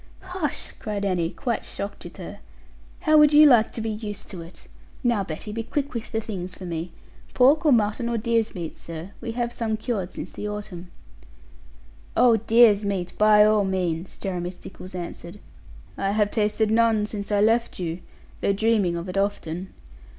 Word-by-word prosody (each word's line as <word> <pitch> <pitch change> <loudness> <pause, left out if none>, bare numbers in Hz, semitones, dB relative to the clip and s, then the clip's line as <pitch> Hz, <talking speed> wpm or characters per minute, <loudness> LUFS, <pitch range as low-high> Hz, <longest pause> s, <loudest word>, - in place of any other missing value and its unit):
'Hush!' 360 -5 -3
cried 210 -4 -3
Annie, 175 -4 0
quite 235 +4 -3
shocked 200 +1 -5
with - - -10
her; - - -8 0.6
'how 310 -1 +5
would 300 0 +6
you 300 +1 +9
like 240 -6 +6
to 225 - -4
be 220 0 -2
used 210 -1 -7
to 180 -4 -7
it? 165 +2 -12 0.4
Now, 235 -5 +2
Betty, 175 +4 -6
be 225 +2 -3
quick 280 +5 -3
with 230 -1 -5
the 225 - 0
things 185 -5 -6
for 185 - -9
me. 170 0 -4 0.4
Pork, 280 +5 +5
or - - +6
mutton, 230 0 +2
or 235 - 0
deer's 230 -1 0
meat, 170 -3 -6
sir? 165 +3 -8
We 230 -1 -4
have 240 0 -2
some 220 -2 -2
cured 215 -5 -3
since - - -7
the 210 - -5
autumn.' 185 -4 -7 1.3
'Oh, 240 -2 +6
deer's 225 -1 +5
meat, 195 -3 -2
by 210 0 +7
all 215 -1 +4
means,' 185 -2 -2
Jeremy 180 -2 -3
Stickles 185 0 -11
answered; 175 +2 -7 0.6
'I 195 0 0
have 210 -1 +2
tasted 215 0 +1
none 225 -2 +3
since 210 -1 -6
I 205 - +3
left 225 +3 +2
you, 170 -1 -3 0.4
though 200 - +2
dreaming 205 -4 +2
of 170 +2 -5
it 185 +2 -1
often. 190 -2 -2
210 Hz, 180 wpm, -24 LUFS, 185-230 Hz, 1.3 s, you